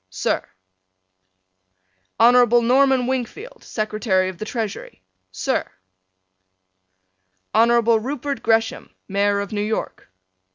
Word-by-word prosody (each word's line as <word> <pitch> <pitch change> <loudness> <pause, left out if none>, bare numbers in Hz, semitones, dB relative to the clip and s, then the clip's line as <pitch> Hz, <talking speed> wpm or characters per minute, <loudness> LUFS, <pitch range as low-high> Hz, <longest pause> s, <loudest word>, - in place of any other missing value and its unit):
Sir: 95 - -1 1.8
Hon. 240 0 +5
Norman 265 0 +3
Wingfield, 260 - -5
Secretary 215 -3 -1
of 185 - -10
the 215 - -4
Treasury. 220 - -6 0.3
Sir: 95 - -2 1.8
Hon. 225 +2 +4 0.3
Rupert 275 +4 -4
Gresham, 225 0 0
Mayor 200 +1 +1
of 200 - -6
New 205 -1 -2
York. 215 - -4
225 Hz, 90 wpm, -21 LUFS, 205-250 Hz, 1.8 s, Hon